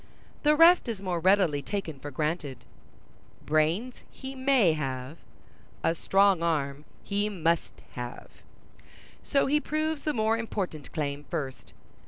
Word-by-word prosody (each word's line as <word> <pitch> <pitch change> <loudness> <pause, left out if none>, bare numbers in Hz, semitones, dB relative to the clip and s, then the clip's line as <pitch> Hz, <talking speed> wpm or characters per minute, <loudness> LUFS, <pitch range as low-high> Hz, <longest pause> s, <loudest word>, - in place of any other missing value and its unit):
The 300 0 +4
rest 335 -3 +6
is 220 -4 -3
more 185 -3 -2
readily 180 -5 +3
taken 165 -6 -4
for 145 - -7
granted. 150 -1 -3 0.8
Brains 160 +11 +1 0.2
he 265 0 -8
may 260 - +3
have—a 135 +3 -5
strong 195 +1 +3
arm 145 -4 -1 0.2
he 205 +1 -1
must 170 -4 -1
have: 120 0 -7 0.9
so 275 - +1
he 295 +2 +2
proves 310 0 -2
the 305 - -1
more 220 -1 +1
important 190 -9 -4
claim 145 -2 -3
first. 140 -7 -5
175 Hz, 125 wpm, -28 LUFS, 150-230 Hz, 0.9 s, rest